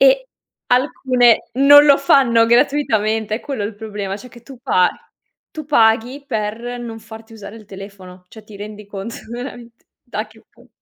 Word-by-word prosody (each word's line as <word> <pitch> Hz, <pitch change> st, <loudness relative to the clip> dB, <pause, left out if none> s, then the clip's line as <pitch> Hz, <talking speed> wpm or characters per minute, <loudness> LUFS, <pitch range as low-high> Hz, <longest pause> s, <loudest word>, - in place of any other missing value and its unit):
e -, -, +4 dB, 0.4 s
alcune 250 Hz, -2 st, +2 dB
non 290 Hz, +2 st, +7 dB
lo 280 Hz, -1 st, +7 dB
fanno 255 Hz, -4 st, +4 dB
gratuitamente, 220 Hz, -4 st, +1 dB
è -, -, -8 dB
quello 270 Hz, -7 st, -5 dB
il 210 Hz, +1 st, -5 dB
problema, 205 Hz, -2 st, -6 dB
cioè 250 Hz, -, -12 dB
che 240 Hz, -1 st, -16 dB
tu 255 Hz, +1 st, -13 dB
pa 185 Hz, -9 st, +2 dB, 0.6 s
tu 310 Hz, -, -8 dB
paghi 245 Hz, 0 st, +2 dB
per 230 Hz, 0 st, -4 dB
non 230 Hz, -2 st, -7 dB
farti 225 Hz, +1 st, -13 dB
usare 210 Hz, 0 st, -10 dB
il 220 Hz, -, -14 dB
telefono, 190 Hz, -2 st, -12 dB
cioè 220 Hz, +1 st, -14 dB
ti 215 Hz, -1 st, -13 dB
rendi 210 Hz, +1 st, -9 dB
conto 205 Hz, +3 st, -7 dB
veramente, 240 Hz, -1 st, -9 dB, 0.2 s
da -, -, -5 dB
che -, -, -21 dB
pu -, -, -23 dB
230 Hz, 165 wpm, -18 LUFS, 210-255 Hz, 0.6 s, non